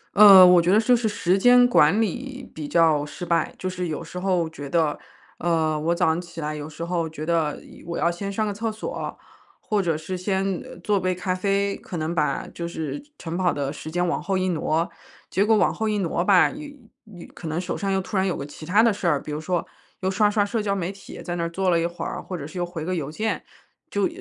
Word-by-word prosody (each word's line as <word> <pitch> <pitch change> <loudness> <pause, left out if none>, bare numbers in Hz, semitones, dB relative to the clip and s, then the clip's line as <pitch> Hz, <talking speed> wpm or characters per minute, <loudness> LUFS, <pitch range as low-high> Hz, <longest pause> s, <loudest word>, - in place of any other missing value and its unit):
呃， 200 -3 +10
我 180 -1 +7
觉 175 +2 +2
得 210 - +6
就 245 +3 +4
是 230 -2 0
时 195 -2 +1
间 245 +2 +6
管 190 -3 +4
理 260 +4 -3
比 150 -2 -6
较 160 -3 +3
失 150 +4 -7
败。 170 -2 +1
就 185 - -4
是 180 -1 -3
有 155 - -4
时 180 - -7
候 180 -3 +1
觉 145 -3 -8
得， 155 -1 +1 0.4
呃， 160 -2 +1
我 170 +3 0
早 - - +2
上 160 +2 +1
起 170 -1 -11
来 150 0 -3
有 150 0 -6
时 165 +2 -6
候 170 -2 -1
觉 155 0 -7
得 160 -3 0
一 - - -15
我 170 0 -5
要 170 - +2
先 195 +3 -5
上 215 +2 -1
个 205 - -2
厕 225 +2 -2
所， 350 - -5 0.4
或 210 -2 0
者 165 -4 0
是 160 +4 -5
先 190 0 -1 0.2
做 205 -2 +2
杯 185 -1 0
咖 185 0 -2
啡。 200 +1 0
可 180 - -7
能 160 +1 -2
把 155 -3 0
就 170 -1 -4
是 155 -4 -5 0.2
晨 165 -1 -5
跑 180 -1 +2
的 140 0 -3
时 155 - -8
间 175 +2 0
往 175 - -1
后 190 +1 -1
一 185 0 0
挪， 165 0 0 0.4
结 195 - +2
果 220 +1 +4
往 - - +3
后 220 -1 -1
一 210 - 0
挪 175 -2 0
吧， 190 -2 +5
又 295 +2 -8 0.5
又， 170 - -10
可 165 - -8
能 160 +2 -2
手 180 - -3
上 195 -1 -2
又 190 - +2
突 195 +2 -6
然 190 0 +2
有 180 - -1
个 140 - -5
其 155 +2 -11
他 210 +5 +5
的 230 -3 +4
事 195 - -3
儿。 150 -4 +3
比 150 - -8
如 150 - -3
说 175 +2 -1 0.4
又 190 0 0
刷 210 +2 +3
刷 205 -1 +2
社 220 +1 -1
交 200 -1 0
媒 185 -1 -2
体 195 0 -11
在 175 - -3
那 170 - -1
儿 170 - -1
坐 185 +1 0
了 170 - +3
一 170 - +1
会 175 - -6
儿， - - -4
或 185 - -6
者 145 - -6
是 165 +4 -7
又 175 - 0
回 165 -3 -6
个 185 - -1
邮 150 -4 -3
件， 220 +6 -2 0.5
就 200 -1 +1
180 Hz, 280 characters per minute, -24 LUFS, 165-200 Hz, 0.5 s, 呃